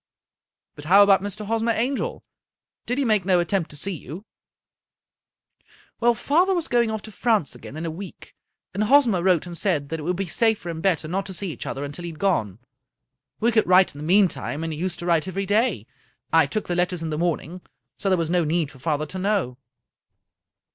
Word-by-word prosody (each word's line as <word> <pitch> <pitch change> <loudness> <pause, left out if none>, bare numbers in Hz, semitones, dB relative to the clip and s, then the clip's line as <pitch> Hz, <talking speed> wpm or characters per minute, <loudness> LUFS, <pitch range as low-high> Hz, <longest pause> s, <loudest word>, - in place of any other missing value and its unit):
" - - -65
But 145 - -10
how 195 +5 +7
about 200 -1 +5
Mr. 205 +1 -6
Hosmer 225 +2 0
Angel? 250 +5 -2 0.6
Did 245 - -1
he 280 - +1
make 215 -4 +2
no 185 -1 +3
attempt 175 -1 -1
to 150 - -8
see 195 +7 -1
you? 170 - -9 0.5
" - - -68
" - - -30
Well, 240 0 +3
father 350 - +2
was 345 -3 -1
going 235 -2 +2
off 220 -1 -4
to 220 - -10
France 215 - 0
again 145 - -10
in 160 - -4
a 165 - -3
week, 185 +4 -10 0.4
and 205 +3 0
Hosmer 235 -7 +4
wrote 180 -3 +2
and 175 -1 -8
said 160 -7 0
that 160 - -3
it - - -6
would 180 +4 -1
be 195 +2 -2
safer 215 0 0
and 165 -1 -5
better 170 -4 +1
not 190 +4 -2
to 190 - -5
see 185 0 -2
each - - -7
other 135 - -4
until 145 +4 -6
he - - -4
had - - -14
gone. 110 - 0 0.8
We 235 +2 +2
could 220 -1 +2
write 185 +1 +5
in 145 - -11
the - - -6
meantime, 175 -3 +1
and 165 -1 -3
he 150 - -7
used 180 0 -1
to 175 - -6
write 170 -1 +2
every 195 +1 -3
day. 205 - +1 0.5
I 165 0 +5
took 215 - -3
the 175 - -1
letters 180 -1 0
in 160 - -3
the - - -1
morning, 175 +1 -2 0.4
so 195 - -1
there 185 - +3
was 165 -1 -1
no 175 -1 +2
need 155 -1 0
for 135 - -16
father 155 +1 -1
to 185 +5 -7
know." 190 -11 -1
185 Hz, 225 wpm, -23 LUFS, 160-210 Hz, 0.8 s, how